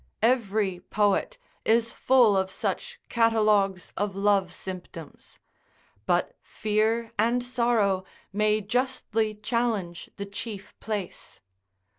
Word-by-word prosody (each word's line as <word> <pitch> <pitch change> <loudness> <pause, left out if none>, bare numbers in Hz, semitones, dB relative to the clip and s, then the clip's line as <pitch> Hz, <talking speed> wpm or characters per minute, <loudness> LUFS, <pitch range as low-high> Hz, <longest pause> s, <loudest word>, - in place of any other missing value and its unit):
Every 215 -6 +2
poet 205 - 0 0.3
is 230 +1 +2
full 245 -6 +4
of 190 0 +1
such 485 - -4
catalogues 215 -5 +2
of 200 -1 -2
love 195 -2 +2
symptoms; 185 0 -9 0.7
but - - +1
fear 220 +2 0
and 235 +3 +2
sorrow 235 -6 +1 0.3
may 215 +1 +2
justly 225 -1 -1
challenge 210 -5 -2
the 200 - -4
chief 200 0 -7
place. 205 -5 -5
215 Hz, 100 wpm, -27 LUFS, 195-235 Hz, 0.7 s, full